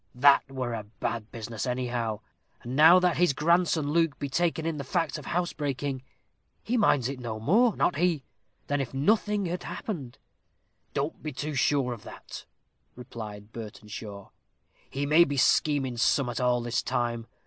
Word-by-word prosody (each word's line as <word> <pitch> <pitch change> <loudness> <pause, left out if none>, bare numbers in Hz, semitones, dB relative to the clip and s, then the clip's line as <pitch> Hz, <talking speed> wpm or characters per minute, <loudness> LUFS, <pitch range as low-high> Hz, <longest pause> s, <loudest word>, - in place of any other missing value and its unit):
That 140 +3 +5
were 130 -3 -3
a 110 -2 -4 0.2
bad 115 -2 -3
business, 115 0 -5
anyhow; 120 -3 -2 0.4
and 120 +2 -5
now 160 +5 +8
that 180 -1 +2
his 175 -4 +3
grandson 160 -1 +2
Luke 165 -2 +2
be 140 - -4
taken 165 +2 0
in 165 -2 -1
the 140 - -4
fact 165 +2 -1
of 145 - -11
housebreaking, 145 -6 -2 0.6
he 240 - -1
minds 145 - +3
it 135 -1 -5
no 115 -3 -5
more, 215 - +3
not 175 - +1
he, 165 -4 +1 0.4
than 145 0 0
if 135 0 -5
nothing 205 +6 +2
had 175 +1 -3
happened." 155 - -6 0.8
"Don't 140 +3 -2
be 155 - -4
too 145 +3 -4
sure 135 -1 +1
of 115 - -10
that," - - -10 0.5
replied 110 -4 -9
Burtenshaw; 105 -2 -8 0.6
"he 140 +1 -2
may 155 +4 +6
be 145 -3 -2
scheming 135 -2 +2
summat 120 0 +1
all 125 -1 +2
this 120 +1 -1
time. 120 -1 -2
140 Hz, 160 wpm, -28 LUFS, 120-165 Hz, 0.8 s, now